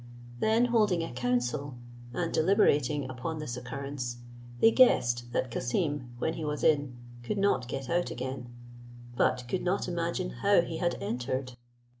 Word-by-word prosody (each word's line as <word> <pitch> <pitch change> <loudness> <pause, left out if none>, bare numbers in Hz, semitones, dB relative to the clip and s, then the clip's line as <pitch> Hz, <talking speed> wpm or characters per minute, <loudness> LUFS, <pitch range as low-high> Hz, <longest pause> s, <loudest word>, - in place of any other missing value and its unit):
Then 225 +2 +3
holding 210 -8 +2
a 165 - -5
council, 125 +3 -1 0.4
and 165 +6 -2
deliberating 150 - +3
upon 130 +5 -4
this 150 -6 -4
occurrence, 125 -1 -5 0.4
they 225 - +6
guessed 120 - +4
that 125 0 -1
Cassim, 130 +2 -1
when 160 +6 -1
he 165 - -5
was 150 -1 -3
in, 145 -5 +2 0.2
could 120 +12 -3
not 195 -11 +2
get 135 +1 -4
out 175 +5 0
again; 130 -1 -5 0.7
but 125 0 +1
could 180 +9 -1
not 185 +3 0
imagine 170 - -2
how - - +5
he - - -5
had - - 0
entered. 130 +1 -3
140 Hz, 150 wpm, -29 LUFS, 125-170 Hz, 0.7 s, they